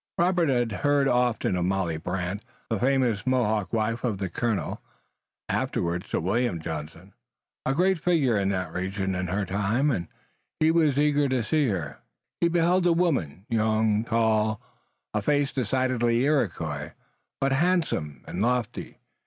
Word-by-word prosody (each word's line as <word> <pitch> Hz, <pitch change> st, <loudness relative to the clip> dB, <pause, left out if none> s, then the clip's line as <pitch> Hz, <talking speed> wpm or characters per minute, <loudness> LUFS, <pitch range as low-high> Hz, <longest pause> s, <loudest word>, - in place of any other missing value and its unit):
Robert 175 Hz, -2 st, +2 dB
had 120 Hz, -3 st, +1 dB
heard 145 Hz, -1 st, +3 dB
often 125 Hz, -6 st, +1 dB
of 90 Hz, -1 st, 0 dB
Molly 95 Hz, -4 st, 0 dB
Brant, 90 Hz, +4 st, -3 dB, 0.3 s
the 110 Hz, -, 0 dB
famous 125 Hz, -4 st, +1 dB
Mohawk 110 Hz, -7 st, +1 dB
wife 115 Hz, +1 st, -1 dB
of 115 Hz, -5 st, 0 dB, 0.2 s
Colonel, 115 Hz, -5 st, -2 dB, 0.7 s
afterward 85 Hz, +1 st, -1 dB
Sir -, -, -1 dB
William 100 Hz, +1 st, 0 dB
Johnson, 80 Hz, +4 st, -7 dB, 0.5 s
a 135 Hz, -, +1 dB
great 185 Hz, +2 st, +2 dB
figure 150 Hz, -8 st, +2 dB
in 100 Hz, -1 st, +1 dB
that 90 Hz, -4 st, -2 dB
region 95 Hz, +1 st, -2 dB
in 90 Hz, 0 st, -2 dB
her 95 Hz, +3 st, -1 dB
time, 105 Hz, +10 st, +1 dB
and 85 Hz, -9 st, -2 dB, 0.5 s
he 155 Hz, +1 st, +4 dB
was 155 Hz, -5 st, +3 dB
eager 145 Hz, -1 st, +3 dB
to 130 Hz, -3 st, +1 dB
see 150 Hz, +4 st, +1 dB
her. 85 Hz, -, -3 dB, 0.4 s
He 170 Hz, -, +3 dB
beheld 175 Hz, +2 st, +2 dB
a 170 Hz, -, +4 dB
woman, 115 Hz, -, 0 dB
young, 110 Hz, -1 st, +1 dB
tall, 110 Hz, -2 st, +1 dB, 0.5 s
a -, -, 0 dB
face 145 Hz, -1 st, +1 dB
decidedly 125 Hz, -1 st, +1 dB
Iroquois, 80 Hz, -, -1 dB, 0.5 s
but 135 Hz, 0 st, +1 dB
handsome 150 Hz, -, 0 dB
and 90 Hz, -, -4 dB
lofty. 125 Hz, +1 st, -1 dB
115 Hz, 145 wpm, -26 LUFS, 95-140 Hz, 0.7 s, he